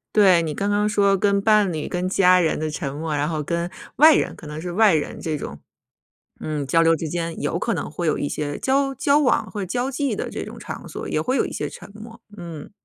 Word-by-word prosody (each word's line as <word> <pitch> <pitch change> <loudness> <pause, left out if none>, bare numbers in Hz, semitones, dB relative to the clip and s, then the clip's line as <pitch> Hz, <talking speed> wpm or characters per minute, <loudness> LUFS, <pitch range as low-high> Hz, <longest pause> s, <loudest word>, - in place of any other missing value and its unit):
对， 190 -5 +6
你 160 -2 -3
刚 200 +1 -1
刚 205 +1 +2
说 200 -1 +3
跟 200 +1 +2
伴 210 -4 +3
侣、 155 - -4
跟 180 +1 -2
家 185 -1 +4
人 165 -3 +1
的 155 0 -2
沉 140 -2 -4
默， 155 +1 -3
然 145 0 0
后 155 -2 -2
跟 170 +3 -2 0.3
外 310 +2 +8
人， - - 0
可 155 - -11
能 150 +1 -6
是 175 0 -5
外 210 0 +4
人 155 -2 -2
这 155 -2 -3
种。 70 - -7 0.8
嗯， 150 -3 -3
交 165 +5 +3
流 165 0 +5
之 165 0 -2
间 165 +1 -3
有 145 - -1
可 - - -1
能 - - -3
会 170 +3 -4
有 155 - +1
一 145 - -2
些 145 0 -4
交 275 +1 +1
交 285 +3 +3
往 250 -6 +1
或 205 - -5
者 - - -2
交 245 +8 -2
际 275 0 -1
的 - - -4
这 - - -5
种 - - -9
场 - - -8
所， - - -6
也 - - -1
会 255 +2 0
有 - - +2
一 - - -6
些 - - -3
沉 - - -12
默， 225 +2 -11 0.2
嗯。 165 -2 -8
175 Hz, 270 characters per minute, -22 LUFS, 155-210 Hz, 0.8 s, 外